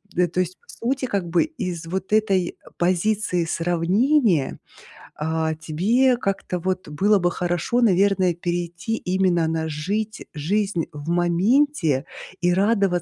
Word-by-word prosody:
Э, 180 0 +3
то 175 +2 -3
есть 185 0 -1
по - - -31
сути 255 +3 -2
как 200 -7 -2
бы 170 +1 +3
из 185 - -5
вот 190 +4 -4
этой 195 -5 +2 0.2
позиции 185 +1 +1
сравнения, 175 - +1 0.6
э, 160 +1 0
тебе 220 +12 +2
как-то 195 -5 -2
вот 185 0 -3
было 200 +8 +3
бы 175 -1 +1
хорошо, 175 +7 -1
наверное, 195 -3 +3
перейти 175 +4 -3
именно 180 -4 +1
на 160 0 -1
жить 205 +9 -3
жизнь 180 +3 -1
в 150 +1 -8
моменте 175 - +2 0.3
и 175 0 +2
радоваться 200 +2 +3
180 Hz, 135 wpm, -23 LUFS, 170-210 Hz, 0.6 s, Э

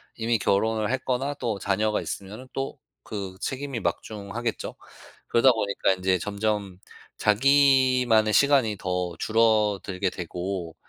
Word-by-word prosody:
이미 115 0 0
결혼을 110 +2 +1
했거나 130 +2 -1
또 110 -5 -2
자녀가 105 +2 0
있으면은 105 +6 -7
또 135 +2 -4 0.3
그 95 -4 -5
책임이 135 0 -4
막중하겠죠. 105 +5 -4 0.5
그러다 125 +2 +5
보니까 100 -3 0
인제 95 0 +1
점점 105 -1 -2 0.4
자기만의 130 -2 +4
시간이 135 -7 +4
더 90 -1 -2
줄어들게 105 -4 +1
되고 90 -1 -5
110 Hz, 275 characters per minute, -25 LUFS, 100-125 Hz, 0.5 s, 그러다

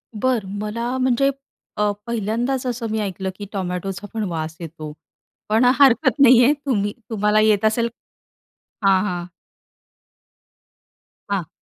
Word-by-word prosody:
बरं, 230 -2 0
मला 230 +4 -3
म्हणजे 260 +1 +2 0.5
अ, 210 0 +2 0.2
पहिल्यांदाच 235 +4 -1
असं 235 -1 -3
मी 220 - -1
ऐकलं, 190 -2 -3
की 205 +1 -7
टोमॅटोचा 190 +1 -4
पण 220 -1 -2
वास 160 -1 -4
येतो. 155 -2 -8 0.6
पण 225 +4 +3
हरकत 270 +1 +4
नाहीये 255 0 +7
तुम्ही 205 -6 0 0.2
तुम्हाला 210 -1 +2
येत 215 -1 +3
असेल. 230 +2 +2 1.0
हां, 195 -1 +5
हां. 180 -3 -3 2.1
हां. 180 -5 -1
215 Hz, 120 wpm, -21 LUFS, 195-240 Hz, 2.1 s, नाहीये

